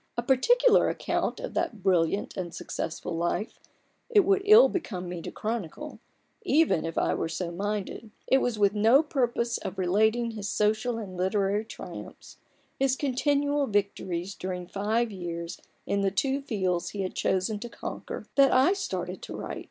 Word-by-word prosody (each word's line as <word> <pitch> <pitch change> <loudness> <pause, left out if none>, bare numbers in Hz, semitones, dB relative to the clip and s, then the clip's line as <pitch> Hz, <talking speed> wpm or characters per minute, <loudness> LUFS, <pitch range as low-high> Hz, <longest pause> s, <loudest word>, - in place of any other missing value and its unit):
A 235 - 0
particular 480 - +4
account - - -2
of - - -6
that 210 -5 -2
brilliant 185 +1 +1
and 175 -3 -5
successful 165 +1 -4
life 175 +6 -2 0.5
it 430 -4 +6
would 395 +1 +2
ill 430 +4 +9
become 185 - -4
me 175 -1 -5
to - - -6
chronicle, 225 - -5 0.4
even 295 - +2
if 165 - -6
I - - +2
were 165 - -2
so 170 +1 -3
minded: 205 +4 -4 0.2
it 265 - +4
was 245 -4 -1
with 205 -1 +3
no 225 +8 +5
purpose 240 -5 0
of 185 - -6
relating 220 +6 +2
his 210 -2 -5
social 220 +3 +1
and 200 -5 -7
literary 195 +3 0
triumphs, 225 - -10 0.4
his 270 -1 +2
continual 285 +1 +1
victories 195 -3 -1
during 180 -1 -5
five 215 +5 -1
years 170 -3 -6 0.2
in 200 - 0
the 195 - +2
two 270 +8 0
fields 190 -9 -1
he 200 -2 -4
had 185 - -4
chosen 190 +3 0
to 240 +2 -6
conquer, - - -7
that 275 -1 +5
I 265 +9 +5
started 395 -1 -4
to - - -7
write. - - -5
215 Hz, 165 wpm, -27 LUFS, 185-265 Hz, 0.5 s, ill